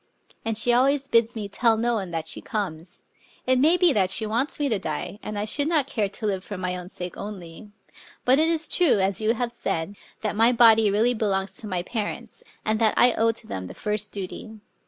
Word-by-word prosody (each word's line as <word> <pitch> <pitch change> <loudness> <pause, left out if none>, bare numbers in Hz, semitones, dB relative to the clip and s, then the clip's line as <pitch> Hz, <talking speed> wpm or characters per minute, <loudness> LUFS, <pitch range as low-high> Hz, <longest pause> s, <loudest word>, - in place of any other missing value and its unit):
And 225 -1 -1
she 240 +2 +4
always 270 +3 +2
bids 230 -1 +2
me 210 -2 -4
tell 225 +2 +2
no 240 +2 0
one 195 -5 -2
that 165 -1 -4
she - - -1
comes. 180 -7 -5 0.4
It 255 0 +3
may 320 +6 +4
be 355 -4 +4
that 190 -4 +2
she 220 +3 +4
wants 235 +9 -2
me 290 - +1
to 220 -6 0
die; 205 - -5
and 210 0 -6
I 205 - -1
should 285 +7 0
not 315 -5 +2
care 215 -7 -2
to 215 +3 -6
live 190 -3 -1
for 205 - -7
my 180 0 -3
own 180 0 -8
sake 180 -2 -7
only. 200 -1 -9 0.6
But 260 +3 +5
it 320 - +3
is 325 -1 0
true, 345 - +3
as 195 +1 0
you 220 +2 +2
have 240 0 -2
said, 195 -5 -3 0.3
that 215 -1 -2
my 230 +3 +4
body 225 -3 +6
really 220 +5 +2
belongs 195 -3 -1
to 215 - -4
my 180 -3 -2
parents, 215 +1 -5 0.2
and 215 0 0
that 220 -2 +2
I 245 -1 +5
owe 225 0 +2
to 225 0 -13
them 95 - -6
the - - -10
first 210 0 -2
duty. 200 +3 -7
215 Hz, 230 wpm, -24 LUFS, 195-240 Hz, 0.6 s, body